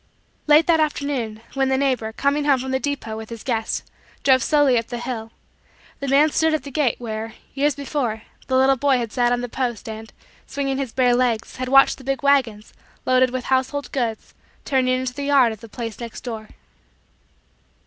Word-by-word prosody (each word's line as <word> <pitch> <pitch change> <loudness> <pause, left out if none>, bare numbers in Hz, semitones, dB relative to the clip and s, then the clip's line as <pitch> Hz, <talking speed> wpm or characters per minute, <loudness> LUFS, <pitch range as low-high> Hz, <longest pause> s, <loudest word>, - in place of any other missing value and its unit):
Late 300 +2 +6
that 330 -2 +3
afternoon, 280 -8 -1
when 270 -1 +1
the 265 - +2
neighbor, 255 -5 0
coming 280 +5 0
from 265 -2 +2
the 265 - +1
depot 270 -6 -3
with 220 0 -8
his 230 -2 -8
guests, 225 -4 -2 0.4
drove 260 -1 +5
slowly 290 -2 +3
up 230 - -6
the 240 - -5
hill, 235 -2 -5 0.7
the 280 - -4
man 290 +3 +4
stood 320 +1 +2
at 310 - -3
the 280 - -8
gate 270 -4 +1
where, 225 -1 -5 0.2
years 285 +1 +1
before, 265 -6 -3 0.2
the 260 - +2
little 265 +1 +4
boy 275 0 +3
had 235 -3 -3
sat 240 +1 +2
on 245 0 +1
the 245 - -3
post, 240 -3 -3
and, 220 0 -7 0.4
swinging 275 -1 -2
his 265 -4 -3
bare 250 -1 +3
legs, 240 -3 0
had 255 0 -3
watched 270 +1 +5
the - - -12
big 270 +1 -2
wagons, 250 -7 +1 0.3
loaded 255 0 +4
with 255 0 -4
household 265 +2 -1
goods, 235 -5 -3 0.3
turning 255 -2 +2
into 255 -1 -3
the 280 +2 -5
yard 275 -5 +4
of 220 - -8
the 230 - -11
place 225 -1 -6
next 235 -2 -7
door. 220 -3 -6
255 Hz, 195 wpm, -22 LUFS, 230-280 Hz, 0.7 s, Late